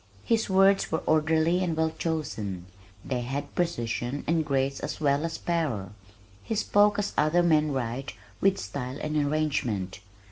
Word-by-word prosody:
His 225 -2 +1
words 195 +1 +4
were 160 - -1
orderly 160 +3 +2
and 165 -3 -1
well 160 0 +2
chosen. 110 - -3 0.4
They 125 -2 -1
had 140 +4 -4
precision 125 -5 -2
and 165 0 +2
grace 135 -2 0
as - - -5
well 145 -1 +2
as 165 0 -3
power. 140 - -2 0.5
He 225 - -3
spoke 205 -1 +3
as 205 -1 -1
other 160 +4 +3
men 155 -3 +3
write, 130 0 -3 0.3
with 195 0 +4
style 125 +7 -5
and 155 0 -3
arrangement. 140 -11 0
155 Hz, 150 wpm, -27 LUFS, 130-170 Hz, 0.5 s, words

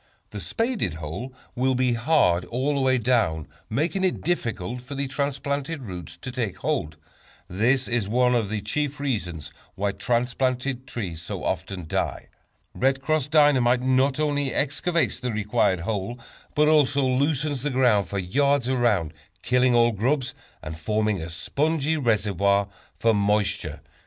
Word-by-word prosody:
The - - -6
spaded 225 - -1
hole 80 - -6 0.2
will 130 +1 +1
be 125 -1 +2
hard 115 - +3
all 130 +5 -1
the 140 - 0
way 130 -1 +3
down, 110 - +1 0.2
making 160 - 0
it 185 - 0
difficult 120 - -2
for 135 +3 -8
the 140 0 -2
transplanted 140 +2 -2
roots 90 -6 -8
to 125 - -4
take 120 -7 -3
hold. 75 0 -2 0.5
This 125 +8 +1
is 115 -4 -1
one 125 +2 +3
of 115 -5 +1
the 105 -1 -2
chief 145 +7 -2
reasons 90 - -3 0.2
why 100 +1 0
transplanted 125 +3 -1
trees 90 -8 -5
so 85 - -5
often 95 -4 -3
die. 80 - -2 0.4
"Red 135 +1 +1
Cross" 150 0 0
Dynamite 135 -5 +4
not 130 +2 +2
only 145 -3 0
excavates 160 +4 0
the 125 -2 -2
required 105 -4 +1
hole, 105 +4 -3 0.4
but 150 0 +4
also 145 -2 +4
loosens 140 +1 +1
the 145 - -1
ground 125 -7 +3
for 100 - -4
yards 140 +8 +1
around, 110 - +1 0.3
killing 125 0 +3
all 120 0 +5
grubs, 130 +5 0 0.3
and 80 +1 -5
forming 105 +2 0
a 80 - -5
spongy 150 - 0
reservoir 100 - +1 0.3
for 115 -1 +3
moisture. 105 0 0
125 Hz, 150 wpm, -25 LUFS, 105-140 Hz, 0.5 s, all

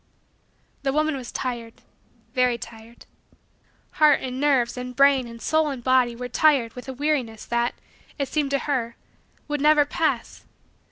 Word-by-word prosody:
The 275 - 0
woman 310 +1 +1
was 255 -3 -7
tired 235 -3 -4 0.6
very 250 -2 +2
tired. 230 0 -12 0.9
Heart 305 -1 +4
and 255 0 -5
nerves 270 -5 +2
and 250 0 -6
brain 275 -2 +4
and 230 0 -10
soul 315 +4 +1
and 265 -4 -6
body 255 -2 +3
were 250 +1 -5
tired 255 -3 +2
with 250 +1 -9
a - - -4
weariness 260 -6 -2
that, 235 0 -1 0.4
it 280 - -1
seemed 295 0 -1
to 275 0 +1
her, 245 -5 -1 0.5
would 295 -1 -2
never 300 0 +5
pass. 315 +2 -2
260 Hz, 155 wpm, -24 LUFS, 240-290 Hz, 0.9 s, never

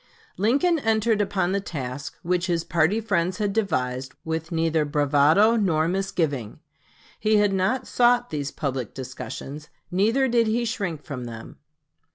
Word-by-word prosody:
Lincoln 285 - +2
entered 220 -3 +2
upon 190 -3 0
the 200 - +1
task 140 -7 -6
which 175 +1 0
his 170 -2 0
party 170 +7 +2
friends 185 -5 0
had 205 -2 -1
devised 135 - -1
with 160 +1 -3
neither 165 -1 +1
bravado 150 +8 +4
nor 165 -8 +2
misgiving. 165 - -2 0.6
He 215 0 +2
had 205 -1 +3
not 210 +8 0
sought 245 0 +3
these 145 -2 -2
public 135 -6 -4
discussions; 135 +3 -7 0.2
neither 225 +9 +2
did 235 -2 +2
he 235 +2 +1
shrink 195 - -3
from 130 -4 -6
them. 115 -1 -9
175 Hz, 145 wpm, -24 LUFS, 150-215 Hz, 0.6 s, bravado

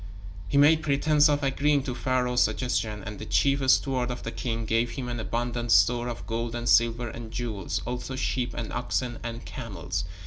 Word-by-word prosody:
He 140 - 0
made 155 +3 +6
pretense 150 +1 +3
of 145 -1 +1
agreeing 140 +1 +2
to 130 - -3
Pharaoh's 125 -1 +1
suggestion, 110 -5 0
and 105 -1 -7
the - - -6
chief 135 +12 +2
steward 130 -2 +3
of 125 - -5
the 115 - -4
king 115 -1 -3
gave 115 +2 +1
him 130 -3 -5
an 120 -1 -3
abundant 120 +1 -2
store 120 +1 +4
of 120 - -6
gold 115 +1 -3
and 120 0 -4
silver 115 0 +3
and 115 0 -8
jewels, 100 -9 -3
also 125 +1 -4
sheep 125 -2 -2
and 115 - -5
oxen 120 0 -2
and 115 0 -6
camels. 95 -6 -5
120 Hz, 185 wpm, -27 LUFS, 115-130 Hz, -, made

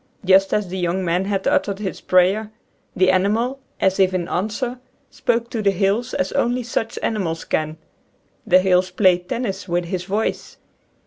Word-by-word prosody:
Just 195 +1 +5
as 210 -2 0
the 190 +1 -4
young 180 +1 -1
man 175 +2 0
had 195 -1 -2
uttered 200 -1 +1
his 195 -2 -5
prayer 190 +4 +2 0.5
the 185 0 +4
animal 220 +8 +1
— - - -42
as 190 0 +1
if 190 -1 +3
in 175 -2 -2
answer 230 +6 -2 0.2
— - - -41
spoke 235 -2 -1
to 225 - -2
the 205 - +3
hills 200 +6 0
as 185 0 -1
only 245 +1 0
such 225 -1 -3
animals 175 -7 -2
can. 155 0 -2 0.7
The 180 - +6
hills 185 0 +2
played 180 -1 +2
tennis 230 -5 -3
with 175 0 -1
his 180 +1 -4
voice. 210 +3 -2
190 Hz, 180 wpm, -21 LUFS, 180-220 Hz, 0.7 s, The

